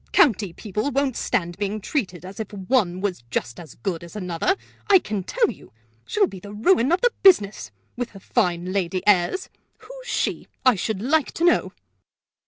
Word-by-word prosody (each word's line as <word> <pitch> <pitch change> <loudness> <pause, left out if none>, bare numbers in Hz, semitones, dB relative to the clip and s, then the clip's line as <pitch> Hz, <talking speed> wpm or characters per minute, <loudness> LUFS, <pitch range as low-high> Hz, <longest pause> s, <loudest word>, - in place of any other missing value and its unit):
County 220 - +4
people 210 +7 -3
won't 275 -2 0
stand 175 -2 -1
being 205 +1 -2
treated 185 - -3
as 190 +3 -9
if 220 - -5
one 190 -2 0
was 195 -9 -2
just 120 0 -3
as 160 -7 -11
good 170 +7 -4
as 170 +4 -11
another, 180 - 0 0.3
I 395 - +9
can 210 - -3
tell 465 - +1
you! - - -15 0.3
She'll 420 -1 +3
be 195 - -8
the 205 +2 -10
ruin 255 - +3
of 350 - +2
the 485 -1 +3
business, 210 - +4 0.3
with 245 -1 -3
her 195 - -10
fine 180 -1 0
lady 185 -1 -1
airs! 205 - +3 0.3
Who's - - -12
she, - - -1 0.2
I 255 - +7
should 205 +1 -3
like 295 +3 +1
to 330 - -3
know?" 350 - +3
210 Hz, 185 wpm, -23 LUFS, 180-280 Hz, 0.3 s, I